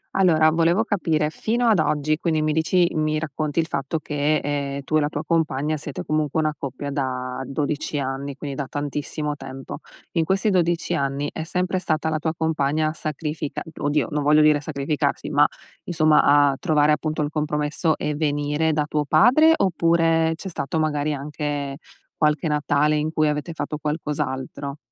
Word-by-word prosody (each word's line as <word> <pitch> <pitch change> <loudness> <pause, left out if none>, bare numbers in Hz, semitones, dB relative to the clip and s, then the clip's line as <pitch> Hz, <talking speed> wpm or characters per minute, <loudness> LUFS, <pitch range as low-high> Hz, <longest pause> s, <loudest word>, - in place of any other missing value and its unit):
Allora, 160 -4 +4
volevo 170 +6 +3
capire 160 -8 0
fino 235 +6 0
ad 210 -7 +4
oggi, 155 0 +1
quindi, 160 -3 0
mi 155 - +1
dici 170 +2 +3
mi 155 0 0
racconti 155 -1 -3
il 165 - +3
fatto 140 +1 -2
che, 150 0 0
ehm, 140 -1 -2
tu 155 +3 +1
e - - +4
la 145 0 0
tua - - -4
compagna 155 -2 0
siete 145 -2 -6
comunque 155 0 0
una 155 -1 +1
coppia 140 +1 -5
da 130 -2 -3
12 150 +1 -2
anni, 135 0 -3
quindi 140 -2 -6
da 140 -2 -4
tantissimo 145 +1 -3
tempo, 135 -1 -8 0.3
in 165 -2 +1
questi 195 +5 +1
12 175 -2 +1
anni, 140 +1 -1
è - - -4
sempre 180 +2 -1
stata 160 -2 -1
la 155 - -1
tua 160 +1 -2
compagna 155 -1 +1
a - - -4
sacrifica 155 -1 -4 0.2
oddio, 145 0 0
non 150 0 0
voglio 150 +1 +5
dire 150 -1 +5
sacrificarsi, 145 0 -2
ma - - +5 0.4
insomma, 155 -3 +4
a 145 -1 +4
trovare 150 -1 +3
appunto 155 0 0
il 145 - -2
compromesso, 150 +1 0
e 150 - -2
venire 150 +1 0
da 150 -1 0
tuo 150 -1 -1
padre, 250 - +5
oppure 165 -2 +2
c'è 190 - -8
stato 160 -3 -3
magari 150 -1 0
anche 145 -1 -4 0.4
qualche 150 +2 +1
Natale 150 0 +2
in 155 +1 -1
cui 155 -1 +2
avete 150 +3 -3
fatto 155 -1 -4
qualcos'altro? 145 -2 -3
150 Hz, 175 wpm, -23 LUFS, 145-160 Hz, 0.4 s, voglio